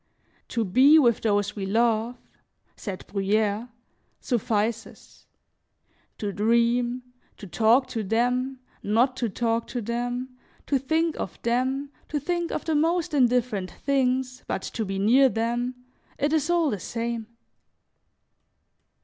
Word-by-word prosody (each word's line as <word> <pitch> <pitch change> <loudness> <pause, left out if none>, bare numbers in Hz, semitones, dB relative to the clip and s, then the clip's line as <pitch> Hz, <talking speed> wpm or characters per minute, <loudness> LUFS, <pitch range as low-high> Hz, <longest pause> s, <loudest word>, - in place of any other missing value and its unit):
"To 230 -2 -1
be 265 - +6
with 240 -7 +4
those 205 -2 0
we 195 -2 -4
love," 230 +3 +1 0.6
said 195 -4 -7
Bruyere, 210 +3 0 0.5
"suffices; 225 -2 -3 0.9
to 205 -2 -3
dream, 235 +3 +1 0.3
to - - -10
talk 225 +7 +3
to 235 -3 -3
them, 250 +5 0 0.2
not 235 +5 +2
to 235 -3 -1
talk 230 +2 -1
to 245 - -4
them, 245 +3 -3 0.4
to 275 - +1
think 320 +4 0
of 185 - -5
them, 260 +4 0 0.2
to 295 - -1
think 345 +3 -2
of - - -3
the 320 - 0
most 330 +2 +1
indifferent 245 -7 +1
things, 255 - -1
but - - -2
to 225 - -3
be 195 0 -3
near 250 +7 +5
them, 240 +2 -1 0.4
it 290 +2 0
is 315 0 +1
all 340 -4 +2
the 205 - -3
same." 230 +3 -4
240 Hz, 130 wpm, -25 LUFS, 220-265 Hz, 0.9 s, be